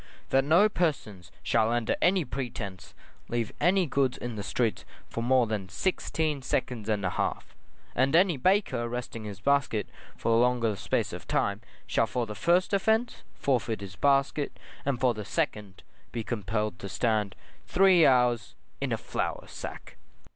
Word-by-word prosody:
That 135 0 +4
no 170 +9 +5
persons 115 - -2
shall 115 -1 +2
under 120 -1 +1
any 180 -2 +3
pretence 120 -8 -6 0.3
leave 115 -2 -1
any 185 +1 +4
goods 135 -3 +1
in 120 -2 -5
the 105 - -4
streets 110 +3 -1 0.2
for 115 - -4
more 125 +1 +4
than 105 -4 -3
sixteen 155 - -1
seconds 120 -3 -2
and 105 -2 0
a 90 - 0
half; - - -3 0.4
and 135 +4 +2
any 180 -1 +5
baker 160 - +1
resting 120 -2 -5
his 100 -2 -7
basket 140 -3 +1 0.3
for 115 - 0
a 115 - +5
longer 120 -3 +2
space - - -1
of - - -8
time, - - 0 0.2
shall 115 - +1
for 120 +3 -1
the 105 - -6
first 170 - +2
offence, 220 +5 +1
forfeit 115 -5 0
his 95 -2 -8
basket, 140 +2 +1 0.3
and 135 -3 0
for 125 -1 +3
the 105 -1 -6
second, 100 -1 -3 0.3
be 115 -2 -3
compelled 105 -1 -2
to 100 - -6
stand 105 -1 0 0.3
three 185 -2 +5
hours 125 -6 +3 0.3
in - - -1
a - - +1
flour - - -3
sack. - - -8
120 Hz, 160 wpm, -28 LUFS, 110-145 Hz, 0.4 s, no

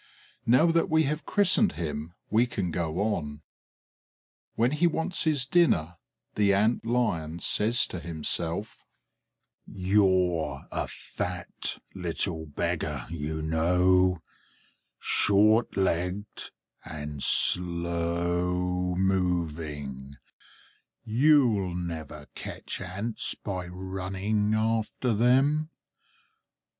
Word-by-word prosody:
Now 125 +7 +5
that 165 0 +1
we 160 0 +4
have 150 0 -3
christened 205 +1 +3
him 80 0 -5 0.2
we 115 +3 +3
can 95 -7 -3
go 85 +2 -2
on. 80 -8 -2 1.1
When 120 +3 +2
he 155 +4 +2
wants 170 +2 -1
his 145 -5 +2
dinner, 90 - +2 0.4
the 100 -2 +3
Ant 110 +4 +2
lion 105 -10 -1
says 110 +6 +2
to 90 - -6
himself: 85 +3 -3 0.8
"You're 90 -6 +1
a - - -2
fat 90 -1 -3 0.2
little 85 -2 0
beggar, 75 -3 -3
you 80 -1 -4
know, 90 +2 +2 0.7
short 105 +3 +3
legged 95 +2 -1 0.3
and 75 -2 -7
slow 85 +1 +1
moving; 80 -7 -2 0.9
you'll 115 - +3
never 80 -4 -6
catch - - -6
Ants 100 +5 -3
by 90 -3 -5
running 95 +3 -2
after 110 +2 0
them. 135 +7 +3
90 Hz, 90 wpm, -27 LUFS, 85-110 Hz, 1.1 s, Now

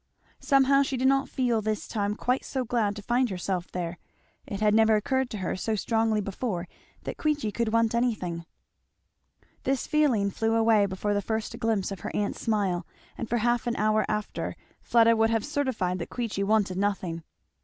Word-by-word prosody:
Somehow 275 0 +4
she 270 -1 -1
did 260 +1 +2
not 270 0 +2
feel 240 -4 +1
this 215 0 -2
time 205 -2 -1
quite 250 +3 0
so 260 -2 -3
glad 220 -4 0
to 210 - -8
find 245 +3 +1
herself 180 -1 -3
there. 175 -1 -4 0.5
It 200 - -4
had 210 -1 +3
never 220 0 +5
occurred 260 +4 0
to 215 - -5
her 185 -3 -2
so 215 +4 -1
strongly 220 0 +1
before 195 -2 -3 0.4
that - - -5
Queechy 295 -8 0
could 230 0 -1
want 230 0 +2
anything. 185 -9 -1 1.1
This 270 0 0
feeling 260 -10 +2
flew 225 +2 0
away 225 -2 +4
before 195 +2 -2
the 205 - +1
first 220 +3 -3
glimpse 220 -5 0
of 195 - -5
her - - -5
aunt's 205 -1 -1
smile, 195 -6 0 0.3
and 230 - -5
for 240 - +1
half 240 +1 +1
an 240 - 0
hour 215 +1 +2
after 210 -1 -3 0.3
Fleda 230 -1 +4
would 225 0 +3
have 225 -2 0
certified 255 -11 -1
that 170 - -5
Queechy 230 -5 -3
wanted 200 -3 +1
nothing. 190 -5 -1
220 Hz, 185 wpm, -27 LUFS, 200-240 Hz, 1.1 s, never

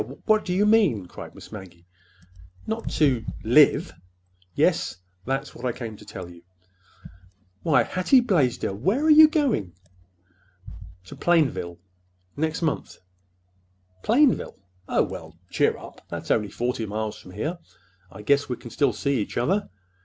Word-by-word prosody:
What 215 -1 +3
do - - -3
you 195 +3 +2
mean?" 200 - +3
cried - - -11
Miss - - -13
Maggie. 95 -5 -11 0.8
"Not 220 +1 -3
to—live!" 135 -7 +3 0.6
"Yes. - - +1 0.3
That's 135 +2 -2
what 120 - -12
I 125 - 0
came 115 -3 -6
to - - -14
tell 90 -2 -8
you." 85 -1 -14 1.2
"Why, 155 - +3
Hattie 185 +9 +3
Blaisdell, 155 - +1
where 200 - +1
are 315 - +5
you 310 +1 +9
going?" 280 - 0 1.3
"To - - -10
Plainville—next 90 - -2
month." 155 - -2 1.0
"Plainville? 255 +3 +2 0.3
Oh, - - +3
well, 80 +1 -8
cheer - - +2
up! - - -12
That's - - -5
only 105 -2 +1
forty 120 +1 -2
miles 105 +1 -4
from 90 - -13
here. 155 - -3 0.5
I 100 +4 -11
guess 140 +5 +2
we 125 - -1
can 120 - -12
still 135 0 +1
see 140 +2 0
each - - -5
other. 185 +13 0
130 Hz, 140 wpm, -25 LUFS, -, 1.3 s, you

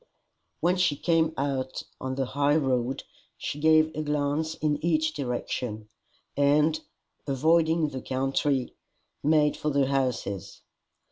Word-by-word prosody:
When 180 +2 +2
she 180 -5 +2
came 165 +1 +2
out 135 -1 -2 0.2
on 130 0 -3
the 135 0 0
high 145 +3 +1
road, 130 -3 0 0.3
she 145 - -4
gave 155 0 +4
a 155 - -2
glance 150 +1 -1
in 150 -2 -1
each 155 -2 +1
direction, 120 -5 -4 0.5
and, 150 +3 +3 0.5
avoiding 160 +3 +3
the 130 -2 -6
country, 135 0 0 0.5
made 150 0 +3
for 150 - -2
the 140 -2 +2
houses. 130 -8 -2
145 Hz, 125 wpm, -27 LUFS, 130-155 Hz, 0.5 s, gave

